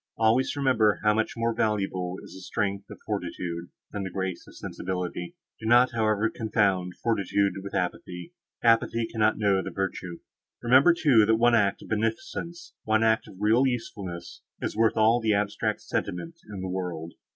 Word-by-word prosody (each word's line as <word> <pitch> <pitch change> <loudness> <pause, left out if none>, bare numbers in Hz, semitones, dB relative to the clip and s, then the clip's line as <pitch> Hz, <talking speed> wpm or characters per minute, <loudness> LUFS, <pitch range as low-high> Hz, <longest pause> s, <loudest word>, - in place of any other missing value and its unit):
Always 115 +5 +2
remember 125 -7 +2
how 105 0 +4
much 110 +1 0
more 115 0 0
valuable 95 -5 -1
is - - -12
the 95 - -10
strength 100 +1 -3
of - - -9
fortitude, 90 -4 -4 0.2
than 105 - -4
the 95 - -3
grace 95 -1 -4
of - - -15
sensibility. 90 -1 -4 0.2
Do 110 - -5
not, 120 +2 +5
however, 110 -2 +1
confound 100 -5 0
fortitude 100 -3 +1
with 100 0 -7
apathy; 90 -1 -4 0.3
apathy 115 0 +3
cannot 110 -1 +1
know 100 -3 +2
the 95 - -5
virtue. 90 -2 -4 0.4
Remember, 130 +8 +6
too, 125 -11 +4
that 110 - +4
one 120 +1 +4
act 100 -4 +2
of - - -13
beneficence, 170 - -3
one 110 0 +2
act 110 0 +2
of - - -12
real 115 +6 +4
usefulness, 100 -8 -5 0.2
is - - -3
worth 115 0 +2
all 115 +2 +4
the 110 -1 +2
abstract 105 +1 -1
sentiment 165 - -4
in 100 -2 -6
the 95 - -3
world. 90 -3 -4
105 Hz, 170 wpm, -27 LUFS, 95-115 Hz, 0.4 s, Remember